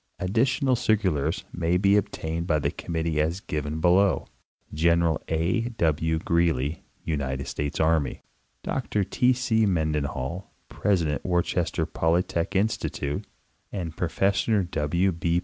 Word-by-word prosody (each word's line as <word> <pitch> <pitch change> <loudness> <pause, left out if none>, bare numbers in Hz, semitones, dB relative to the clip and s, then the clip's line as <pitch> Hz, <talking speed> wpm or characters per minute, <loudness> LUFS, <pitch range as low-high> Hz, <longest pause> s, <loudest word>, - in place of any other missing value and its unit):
Additional 130 +7 +1
cir 115 -2 +2
culars 80 -5 -1
may 85 0 +1
be 100 +2 +4
obtained 85 -4 -2
of 75 -3 +2
the - - +1
committee 80 -2 -2
as 85 +4 -1
given 75 -4 -3
below. 90 +3 +3 0.5
General 85 0 +2
A. 90 +9 0
W. 80 -2 +1
Greely, 80 -3 0 0.2
United 70 -4 -2
States 75 0 -3
Army, 80 -2 +1 0.4
Dr 105 - -1
T. 125 +6 +2
C. 115 -4 +2
Menden 80 -5 +1
hall, 75 +7 -5 0.2
President 85 -8 0
Worcester 85 -2 0
Polytechnic 85 +3 0
Institute, 95 -8 -1 0.4
and 85 -5 -4
Professor 100 +4 +1
W. 85 +3 0
85 Hz, 120 wpm, -26 LUFS, 80-95 Hz, 0.5 s, be